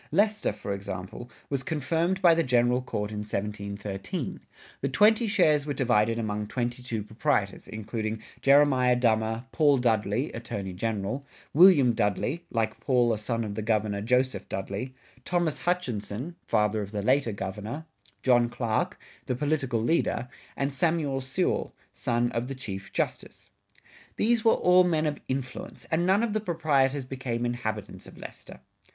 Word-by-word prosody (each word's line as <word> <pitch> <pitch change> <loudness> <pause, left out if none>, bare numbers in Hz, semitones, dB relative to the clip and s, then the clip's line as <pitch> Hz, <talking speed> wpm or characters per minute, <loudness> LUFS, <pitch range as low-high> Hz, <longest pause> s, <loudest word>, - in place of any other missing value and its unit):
Leicester, 210 +5 +2
for 100 - -5
example, 100 +4 -6 0.2
was 140 -2 -2
confirmed 165 +6 -1
by 170 -2 +8
the 165 - +2
General 125 -2 +2
Court 105 -4 -3
in 105 - -4
1713. 100 -1 -4 0.4
The 140 - 0
twenty 215 - +4
shares 155 -8 +3
were 145 - -2
divided 115 -3 +2
among 105 -2 -2
twenty 120 +2 -2
two 115 -4 -3
proprietors, 110 +1 -1
including 110 0 -4 0.2
Jeremiah 135 -3 +5
Dummer, 115 -1 +1
Paul 145 -4 +4
Dudley 115 +2 +1
(Attorney 100 -5 -5
General), 110 +6 -2 0.3
William 150 -7 +7
Dudley 115 +9 -1
(like 110 -1 -1
Paul 120 -3 +2
a - - -1
son 115 +2 -2
of 105 -2 -4
the 110 - -3
Governor, 105 -2 0
Joseph 125 -2 0
Dudley), 100 +7 -4 0.3
Thomas 175 -4 0
Hutchinson 130 - -2
(father 105 0 +2
of 100 - -5
the 105 -2 -3
later 130 0 +2
Governor), 105 +9 -5 0.4
John 120 -2 +4
Clark 115 -2 -1 0.3
(the 125 - 0
political 145 -3 0
leader), 125 -3 +1 0.3
and 140 0 -1
Samuel 145 -2 0
Sewall 135 +8 -1 0.2
(son 120 -2 0
of 115 +1 -2
the 135 - -5
Chief 100 -7 -7
Justice). - - -4 0.6
These 230 0 +2
were 225 - +6
all 180 0 +5
men 160 -3 +1
of 150 -2 -2
influence, 130 -1 -5
and 170 +2 +2
none 195 +4 +4
of 230 -3 0
the 215 - +1
proprietors 145 -8 +1
became 125 -2 -3
inhabitants 110 -5 -4
of - - -14
Leicester. 65 - -10
125 Hz, 150 wpm, -27 LUFS, 110-145 Hz, 0.6 s, by